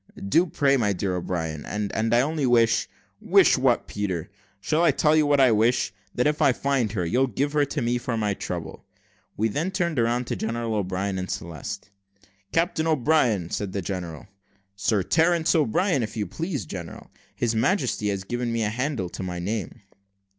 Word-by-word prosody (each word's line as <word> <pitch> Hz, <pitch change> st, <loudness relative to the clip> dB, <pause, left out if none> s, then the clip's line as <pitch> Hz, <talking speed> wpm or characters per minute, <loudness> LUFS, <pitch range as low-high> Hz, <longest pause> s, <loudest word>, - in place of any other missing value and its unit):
"Do, 170 Hz, -, +3 dB
pray, 140 Hz, -3 st, +2 dB
my 105 Hz, -5 st, +1 dB
dear 95 Hz, 0 st, -2 dB
O'Brien, 80 Hz, -4 st, -3 dB
and 105 Hz, -1 st, -3 dB, 0.2 s
I 120 Hz, +1 st, +5 dB
only 150 Hz, 0 st, 0 dB
wish 115 Hz, -2 st, +3 dB, 0.2 s
" -, -, -40 dB
"Wish -, -, +5 dB
what, -, -, +2 dB
Peter? 95 Hz, -4 st, -3 dB, 0.3 s
shall 155 Hz, +11 st, +1 dB
I 170 Hz, -, +5 dB
tell 150 Hz, +2 st, +3 dB
you 155 Hz, -2 st, +3 dB
what 145 Hz, -1 st, +3 dB
I 130 Hz, -3 st, +6 dB
wish? 115 Hz, +3 st, +2 dB, 0.2 s
that 125 Hz, -, +1 dB
if 150 Hz, 0 st, +1 dB
I 135 Hz, -, +5 dB
find 130 Hz, -5 st, 0 dB
her; 90 Hz, -5 st, -1 dB
you'll 125 Hz, +10 st, +2 dB
give 140 Hz, +5 st, -2 dB
her 145 Hz, -1 st, +3 dB
to 140 Hz, -1 st, -3 dB
me 120 Hz, +1 st, 0 dB
for 120 Hz, -2 st, -3 dB
my 105 Hz, -2 st, 0 dB
trouble." 85 Hz, -4 st, -6 dB, 0.5 s
We 110 Hz, -, +2 dB
then 150 Hz, -, -1 dB
turned 175 Hz, -6 st, -1 dB
round 120 Hz, +2 st, +1 dB
to -, -, -3 dB
General 115 Hz, 0 st, -2 dB
O'Brien 95 Hz, -1 st, -2 dB
and 95 Hz, -, -5 dB
Celeste. 85 Hz, +4 st, -6 dB, 0.6 s
"Captain 165 Hz, -1 st, +1 dB
O'Brien," 125 Hz, -, +2 dB
said 100 Hz, -2 st, -3 dB
the 100 Hz, -, -2 dB
general. 85 Hz, -5 st, -5 dB, 0.5 s
"Sir 100 Hz, 0 st, +1 dB
Terence 165 Hz, -, +2 dB
O'Brien, 155 Hz, -, +2 dB
if 110 Hz, 0 st, -4 dB
you 105 Hz, -, -1 dB
please, 160 Hz, -, -4 dB
general. 85 Hz, -3 st, -8 dB, 0.2 s
His 120 Hz, -1 st, 0 dB
Majesty 115 Hz, -, +1 dB
has 100 Hz, -1 st, -2 dB
given 120 Hz, +3 st, -3 dB
me 115 Hz, -1 st, 0 dB
a 105 Hz, -, +1 dB
handle 125 Hz, -3 st, -2 dB
to -, -, -7 dB
my 90 Hz, -1 st, -4 dB
name." 105 Hz, +5 st, -4 dB
115 Hz, 190 wpm, -25 LUFS, 100-145 Hz, 0.6 s, I